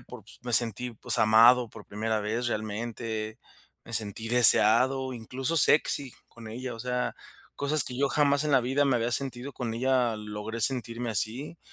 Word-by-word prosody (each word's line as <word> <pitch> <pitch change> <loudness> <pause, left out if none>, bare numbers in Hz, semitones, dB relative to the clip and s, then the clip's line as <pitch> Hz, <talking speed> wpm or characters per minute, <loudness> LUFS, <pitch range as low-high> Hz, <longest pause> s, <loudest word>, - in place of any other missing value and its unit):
pues, 120 -3 -14
me 120 -1 -6
sentí, 120 +1 +2
pues, - - -2
amado 115 +3 +5
por - - -14
primera 110 +1 -3
vez 115 +4 -3
realmente, 110 0 -5 0.5
me 115 - -13
sentí 110 0 -4
deseado, 125 +3 +5
incluso 130 +6 -5
sexy 140 -2 +1 0.2
con 115 -1 -14
ella, 120 +2 -7
o - - -12
sea, 125 +1 -3 0.4
cosas 145 0 +1
que 125 - -8
yo 140 0 +1
jamás 145 0 +1
en 150 - -1
la 135 - +4
vida 135 +4 0
me 135 -2 +1
había 120 +1 -2
sentido, 130 +1 -4
con 115 -3 -5
ella 125 -1 0
logré 105 +2 -7
sentirme 120 -1 -1
así, 120 +10 -2
120 Hz, 170 wpm, -27 LUFS, 110-130 Hz, 0.5 s, amado